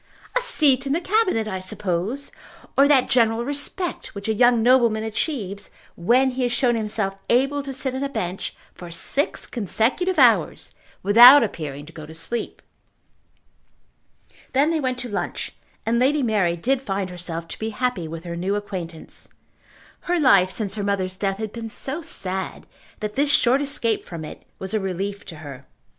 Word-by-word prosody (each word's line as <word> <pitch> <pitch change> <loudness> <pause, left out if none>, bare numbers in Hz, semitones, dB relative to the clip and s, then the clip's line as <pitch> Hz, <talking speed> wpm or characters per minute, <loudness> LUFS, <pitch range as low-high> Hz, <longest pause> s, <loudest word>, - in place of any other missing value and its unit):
"A - - +3
seat 285 - +3
in 275 - +1
the 325 - +1
Cabinet, 370 - +1
I 190 -3 -3
suppose, 185 +7 -3 0.4
or 275 +1 +6
that 275 -3 +4
general 230 -1 +2
respect 290 - -2
which 200 +1 -6
a 220 - +2
young 240 +1 +4
nobleman 235 -3 +4
achieves 215 - -3 0.3
when 250 +9 +3
he 255 +1 -4
has 245 -1 +1
shown 240 0 +2
himself 210 -3 -2
able 275 +4 +2
to 275 -1 -6
sit 265 0 -3
on 265 +1 -3
a 280 - -2
bench 185 -7 -4 0.2
for 175 - -10
six 170 - +1
consecutive 245 - 0
hours - - +3 0.3
without 240 +7 +9
appearing 145 -8 -5
to 165 - -14
go 155 -2 -9
to 160 - -11
sleep." 230 +8 -4 1.9
Then 285 +4 +3
they 325 - 0
went 255 -3 -1
to 250 - -5
lunch, 205 -3 -4 0.3
and 235 +1 +1
Lady 280 +3 +2
Mary 205 -7 +1
did 260 +9 0
find 195 -6 -3
herself 170 -2 -5
to - - -7
be 220 - -2
happy 225 -6 -2
with 165 +1 -7
her 170 -1 -5
new 185 +4 -1
acquaintance. 180 -6 -6 0.8
Her 355 -1 +2
life 200 - +5
since 200 0 -3
her 210 - -3
mother's 190 -2 -1
death 195 0 -2
had 215 -1 -5
been 230 -1 -6
so 275 +8 -4
sad, 190 - -3 0.4
that 210 0 -3
this 285 +4 +1
short 260 0 +4
escape 255 -6 0
from 165 -3 -7
it - - -11
was 190 +1 -6
a 215 - +2
relief 195 +1 -4
to 165 - -9
her. 135 -2 -10
220 Hz, 175 wpm, -23 LUFS, 190-265 Hz, 1.9 s, without